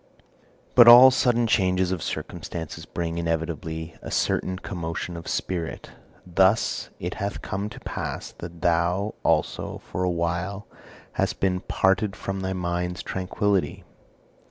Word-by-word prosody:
But 120 Hz, -2 st, +8 dB
all 125 Hz, +2 st, +11 dB
sudden 120 Hz, -2 st, +2 dB
changes 95 Hz, -4 st, +2 dB
of 90 Hz, -3 st, -2 dB
circumstances 80 Hz, 0 st, -5 dB
bring 85 Hz, -1 st, -3 dB
inevitably 80 Hz, 0 st, -3 dB
a -, -, -7 dB
certain 95 Hz, 0 st, 0 dB
commotion 85 Hz, -2 st, -5 dB
of 85 Hz, -1 st, -8 dB
spirit. 85 Hz, -3 st, -3 dB, 0.3 s
Thus 95 Hz, +4 st, +2 dB
it 90 Hz, +1 st, -3 dB
hath 100 Hz, 0 st, -3 dB
come 100 Hz, +2 st, -3 dB
to -, -, -10 dB
pass -, -, -5 dB
that 85 Hz, -1 st, -9 dB
thou 90 Hz, +4 st, +1 dB
also -, -, 0 dB
for 90 Hz, +2 st, -1 dB
awhile 90 Hz, +3 st, -1 dB, 0.5 s
hast -, -, -1 dB
been 90 Hz, -1 st, +1 dB
parted 95 Hz, +2 st, +1 dB
from 95 Hz, 0 st, -4 dB
thy 95 Hz, 0 st, -2 dB
mind's 90 Hz, 0 st, -2 dB
tranquillity. 95 Hz, +1 st, -1 dB
90 Hz, 130 wpm, -25 LUFS, 85-95 Hz, 0.5 s, all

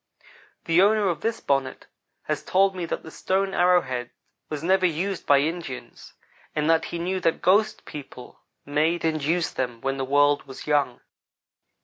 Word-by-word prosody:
The 165 Hz, +2 st, +4 dB
owner 210 Hz, +1 st, +4 dB
of 170 Hz, -, -3 dB
this 230 Hz, 0 st, -1 dB
bonnet 135 Hz, -2 st, -1 dB, 0.4 s
has -, -, -2 dB
told 195 Hz, +1 st, +2 dB
me 175 Hz, -2 st, -4 dB
that -, -, -4 dB
the 160 Hz, -, -10 dB
stone 190 Hz, +3 st, -1 dB
arrow 180 Hz, 0 st, +4 dB
head 125 Hz, -3 st, -4 dB, 0.4 s
was 150 Hz, -1 st, -5 dB
never 185 Hz, +1 st, +3 dB
used 180 Hz, +3 st, -3 dB
by 140 Hz, -1 st, +6 dB
Indians, 145 Hz, -6 st, -5 dB, 0.4 s
and 150 Hz, 0 st, 0 dB
that 165 Hz, 0 st, +2 dB
he -, -, -5 dB
knew 185 Hz, +3 st, -2 dB
that 165 Hz, -2 st, 0 dB
ghost 210 Hz, +4 st, +2 dB
people 135 Hz, -4 st, -10 dB, 0.3 s
made 155 Hz, +4 st, 0 dB
and 155 Hz, -2 st, 0 dB
used 165 Hz, +3 st, 0 dB
them 125 Hz, -3 st, -2 dB
when 135 Hz, 0 st, -2 dB
the 135 Hz, -, -2 dB
world 145 Hz, +2 st, +2 dB
was 135 Hz, -, -9 dB
young. 145 Hz, -5 st, +1 dB
160 Hz, 170 wpm, -25 LUFS, 140-185 Hz, 0.4 s, by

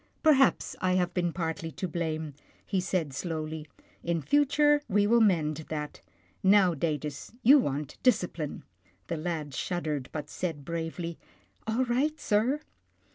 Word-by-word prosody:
" -, -, -40 dB
Perhaps 275 Hz, -5 st, +4 dB
I 185 Hz, 0 st, +2 dB
have 180 Hz, -1 st, +1 dB
been 175 Hz, -2 st, 0 dB
partly 165 Hz, -1 st, -3 dB
to 185 Hz, -, -3 dB
blame," 160 Hz, -3 st, -3 dB, 0.3 s
he 195 Hz, -, 0 dB
said 170 Hz, -6 st, -1 dB
slowly. 155 Hz, 0 st, -4 dB, 0.2 s
" -, -, -32 dB
In 170 Hz, -1 st, 0 dB
future, 290 Hz, -, +3 dB
we 205 Hz, +1 st, +3 dB
will 235 Hz, +3 st, +4 dB
mend 160 Hz, -8 st, +3 dB
that. 150 Hz, -1 st, -5 dB, 0.4 s
Now, 190 Hz, -2 st, +5 dB
Datus, 150 Hz, 0 st, -3 dB
you 280 Hz, +5 st, +8 dB
want 145 Hz, -, -3 dB
discipline." 180 Hz, -, 0 dB, 0.5 s
The 170 Hz, -, -1 dB
lad 155 Hz, -3 st, -3 dB
shuddered, 150 Hz, -3 st, -2 dB
but 150 Hz, -2 st, -5 dB
said 155 Hz, -6 st, -4 dB
bravely, 165 Hz, +1 st, -4 dB, 0.2 s
" -, -, -37 dB
All 230 Hz, +4 st, +1 dB
right, 275 Hz, +6 st, 0 dB
sir." 240 Hz, +8 st, +1 dB
170 Hz, 150 wpm, -29 LUFS, 155-215 Hz, 0.5 s, you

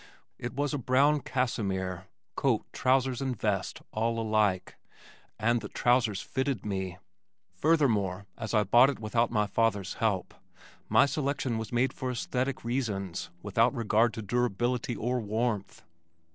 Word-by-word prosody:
It 120 Hz, +1 st, -5 dB
was 145 Hz, +2 st, -1 dB
a 145 Hz, -, -1 dB
brown 140 Hz, +4 st, +3 dB
cassimere, 95 Hz, -9 st, -2 dB, 0.3 s
coat, -, -, +1 dB
trousers 130 Hz, -1 st, +2 dB
and 130 Hz, -5 st, -2 dB
vest 100 Hz, -3 st, -1 dB
all 115 Hz, +1 st, 0 dB
alike, 105 Hz, -4 st, +1 dB, 0.6 s
and 115 Hz, +2 st, +1 dB
the 105 Hz, -, -7 dB
trousers 120 Hz, -5 st, +2 dB
fitted 130 Hz, -4 st, -2 dB
me! 95 Hz, -3 st, -3 dB, 0.6 s
Furthermore 105 Hz, -, +2 dB
as 110 Hz, +1 st, -3 dB
I 105 Hz, -, +4 dB
bought 120 Hz, +7 st, +6 dB
it 140 Hz, -, -3 dB
without 115 Hz, +2 st, +1 dB
my 105 Hz, -2 st, +1 dB
father's 105 Hz, -2 st, 0 dB
help, 105 Hz, -5 st, 0 dB, 0.6 s
my -, -, +6 dB
selection 140 Hz, -5 st, -1 dB
was 110 Hz, -2 st, -6 dB
made 125 Hz, +2 st, +1 dB
for 130 Hz, -1 st, -4 dB
esthetic 125 Hz, +2 st, -2 dB
reasons 100 Hz, -8 st, -2 dB
without 115 Hz, +6 st, +2 dB
regard 115 Hz, 0 st, +2 dB
to 110 Hz, -, -5 dB
durability 120 Hz, +2 st, 0 dB
or 125 Hz, +4 st, -1 dB
warmth. 110 Hz, -2 st, -2 dB
115 Hz, 140 wpm, -29 LUFS, 105-125 Hz, 0.6 s, bought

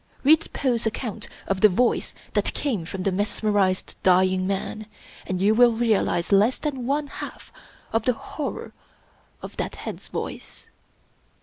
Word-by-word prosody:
Read 315 Hz, +3 st, +4 dB
Poe's 240 Hz, -4 st, 0 dB
account 220 Hz, -1 st, -4 dB, 0.2 s
of 195 Hz, -1 st, -1 dB
the 215 Hz, -, +8 dB
voice 240 Hz, +6 st, +1 dB, 0.2 s
that -, -, 0 dB
came 225 Hz, -, -1 dB
from 185 Hz, +2 st, -5 dB
the 195 Hz, -, +1 dB
mesmerized 205 Hz, -1 st, 0 dB
dying 185 Hz, 0 st, +3 dB
man, 200 Hz, +2 st, -3 dB, 0.4 s
and 185 Hz, -1 st, -2 dB
you 205 Hz, +3 st, +4 dB
will 240 Hz, +1 st, +6 dB
realize 220 Hz, -6 st, +1 dB
less 205 Hz, +6 st, +4 dB
than 270 Hz, -5 st, -3 dB
pne 290 Hz, +2 st, 0 dB
half -, -, -9 dB, 0.4 s
of 225 Hz, -1 st, +1 dB
the 250 Hz, -, +3 dB
horror 285 Hz, +5 st, -6 dB, 0.7 s
of -, -, -8 dB
that -, -, -3 dB
head's -, -, -7 dB
voice. -, -, -6 dB
215 Hz, 145 wpm, -24 LUFS, 190-245 Hz, 0.7 s, the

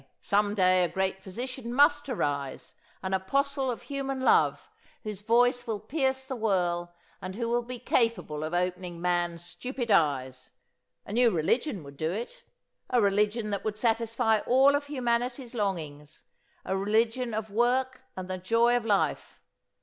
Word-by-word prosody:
Some 205 Hz, 0 st, +1 dB
day 185 Hz, -2 st, +4 dB
a -, -, +2 dB
great 190 Hz, +1 st, -2 dB
physician 235 Hz, +5 st, -6 dB
must 290 Hz, +1 st, +4 dB
arise, 140 Hz, -, -3 dB, 0.3 s
an 190 Hz, 0 st, -2 dB
apostle 270 Hz, +8 st, 0 dB
of 240 Hz, -, -4 dB
human 275 Hz, -1 st, -3 dB
love, 260 Hz, -, +3 dB, 0.4 s
whose 210 Hz, -2 st, -5 dB
voice 245 Hz, +3 st, +2 dB
will 220 Hz, -2 st, -2 dB
pierce 265 Hz, +3 st, -1 dB
the 265 Hz, 0 st, -4 dB
whirl 175 Hz, -6 st, 0 dB, 0.3 s
and 185 Hz, +1 st, -6 dB
who 230 Hz, +1 st, -2 dB
will 240 Hz, +1 st, +1 dB
be 245 Hz, +1 st, -7 dB
capable 230 Hz, -, 0 dB
of 155 Hz, -, -3 dB
opening 180 Hz, 0 st, -2 dB
man's 175 Hz, -1 st, -1 dB
stupid 250 Hz, +2 st, -4 dB
eyes: 130 Hz, -6 st, +1 dB, 0.5 s
A 200 Hz, -, -7 dB
new 240 Hz, +1 st, +5 dB
religion 205 Hz, -, 0 dB
would 140 Hz, 0 st, -12 dB
do 160 Hz, +2 st, -1 dB
it, 235 Hz, -, -5 dB, 0.5 s
a 250 Hz, -, +3 dB
religion 210 Hz, +1 st, +1 dB
that 200 Hz, -, -2 dB
would 215 Hz, -1 st, -3 dB
satisfy 225 Hz, -1 st, +1 dB
all 270 Hz, +3 st, +5 dB
of 285 Hz, 0 st, -1 dB
humanity's 245 Hz, -2 st, -1 dB
longings, 155 Hz, -9 st, -4 dB, 0.4 s
a 190 Hz, -, -1 dB
religion 225 Hz, +4 st, +1 dB
of 220 Hz, -1 st, -4 dB
work 255 Hz, +4 st, +1 dB, 0.2 s
and 185 Hz, -1 st, -5 dB
the 185 Hz, 0 st, -4 dB
joy 230 Hz, +6 st, +3 dB
of 245 Hz, -, 0 dB
life. 205 Hz, -3 st, 0 dB
220 Hz, 155 wpm, -28 LUFS, 185-245 Hz, 0.5 s, new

